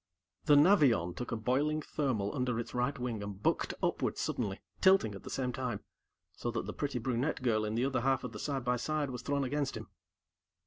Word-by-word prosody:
The 145 - +6
Navion 145 - +5
took 125 - -5
a - - 0
boiling 135 +7 +1
thermal 125 -11 -1
under 125 -3 0
its 120 - -5
right 125 +3 0
wing 120 -4 -3
and 100 -1 -6
bucked - - 0
upward - - 0
suddenly, 100 -5 -2 0.2
tilting 190 - +5
at 100 - -8
the - - -9
same 125 -2 -2
time, 125 -5 -3 0.5
so 120 - -4
that 120 - -2
the - - -5
pretty 140 -3 -2
brunette 125 +4 -1
girl 110 -3 +2
in 105 +1 -2
the 120 +3 +2
other 135 -2 0
half 135 0 +1
of 125 - -4
the - - -8
side 135 -4 -2
by 125 0 +2
side 150 +2 -1
was 125 -2 -5
thrown 140 +2 0
against 140 +1 -1
him. - - -9
125 Hz, 215 wpm, -32 LUFS, 115-140 Hz, 0.5 s, The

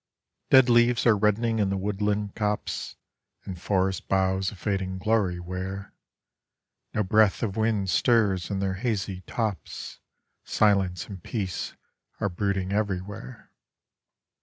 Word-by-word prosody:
Dead 130 -1 +7
leaves 120 0 +4
are 115 -3 +6
reddening 110 +2 +1
in 100 -2 +2
the 100 - -1
woodland 105 +1 -1
copse, 105 -1 -2 0.5
And 90 -2 -7
forest 95 -1 0
boughs 95 0 +1
a - - -10
fading 95 -1 -2
glory 95 -3 +1
wear; 95 +2 -5 1.0
No 105 - +2
breath 105 +2 +3
of 100 -4 -1
wind 110 -3 +1
stirs 100 -3 +2
in 100 -2 -2
their 95 -1 0
hazy 100 -6 -2
tops, 110 -5 -4 0.4
Silence 95 -4 +2
and 95 -4 -8
peace 95 -2 -4 0.4
are 100 - 0
brooding 95 0 -1
everywhere. 105 +3 -4
100 Hz, 125 wpm, -26 LUFS, 95-110 Hz, 1.0 s, Dead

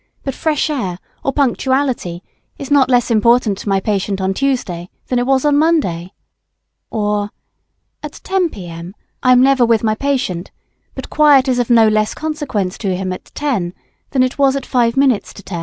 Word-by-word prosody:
But 270 - -3
fresh 310 +1 0
air, 195 -12 -3 0.3
or 275 - 0
punctuality 260 -8 0 0.3
is 280 -1 -8
not 275 -3 +4
less 245 -1 +2
important 230 -2 +3
to - - -5
my 195 0 +2
patient 195 -1 -2
on 190 0 0
Tuesday 190 -9 -2 0.2
than 250 - 0
it 245 - -1
was 270 +1 +2
on 290 -1 +3
Monday. 210 - 0 0.8
Or: 210 -1 -1 0.7
At - - -7
10 380 -2 -1
P.M. 175 - -9 0.3
I 255 - +3
am 250 0 +6
never 270 -2 +4
with 230 -2 +2
my 215 -1 +2
patient; 245 -9 -2 0.5
but - - -8
quiet 290 -3 +5
is 250 -1 +1
of 245 - -1
no 230 -2 +6
less 215 0 +1
consequence 290 -12 -3
to 195 -4 -1
him 185 0 -3
at - - -9
10 215 -13 -2 0.3
than 260 -2 +2
it 255 +2 -2
was 275 -1 +3
at 275 -2 -4
5 240 -1 +1
minutes 265 -6 +2
to 200 - -12
10. 175 -3 -5
245 Hz, 185 wpm, -17 LUFS, 195-275 Hz, 0.8 s, am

